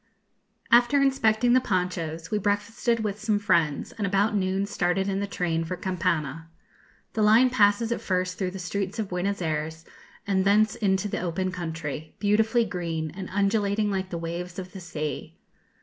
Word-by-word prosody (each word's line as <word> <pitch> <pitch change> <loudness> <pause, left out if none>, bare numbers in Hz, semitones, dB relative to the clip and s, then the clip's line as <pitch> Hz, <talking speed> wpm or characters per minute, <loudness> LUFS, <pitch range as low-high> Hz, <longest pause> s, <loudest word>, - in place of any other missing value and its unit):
After 240 +4 +5
inspecting 245 -3 +3
the 255 - +5
ponchos, 180 -5 -2
we 210 - +1
breakfasted 215 +3 0
with 210 -1 -3
some 215 -1 +1
friends, 170 -8 +1
and 205 -3 -3
about 200 +2 +2
noon 190 0 0
started 190 -1 0
in 195 0 -1
the 200 - -2
train 165 -4 -1
for 180 +2 -4
Campana. 165 -4 -2 0.6
The 220 - -1
line 225 +4 +5
passes 215 0 +3
at 235 - -1
first 185 -1 -1
through 190 -2 0
the 190 - -7
streets 190 +2 -3
of 215 -3 -2
Buenos 180 +1 -2
Ayres, 160 +1 -3 0.4
and 190 -1 +1
thence 210 +2 +4
into 195 -1 0
the - - -3
open 185 +1 -2
country, 160 -3 -5
beautifully 220 +3 +2
green, 165 -5 -3
and 185 +3 -7
undulating 205 +1 +1
like 190 -1 -2
the 170 - -4
waves 170 +2 -5
of 185 -1 -6
the 195 - -8
sea. 155 -5 -5
190 Hz, 170 wpm, -26 LUFS, 175-210 Hz, 0.6 s, After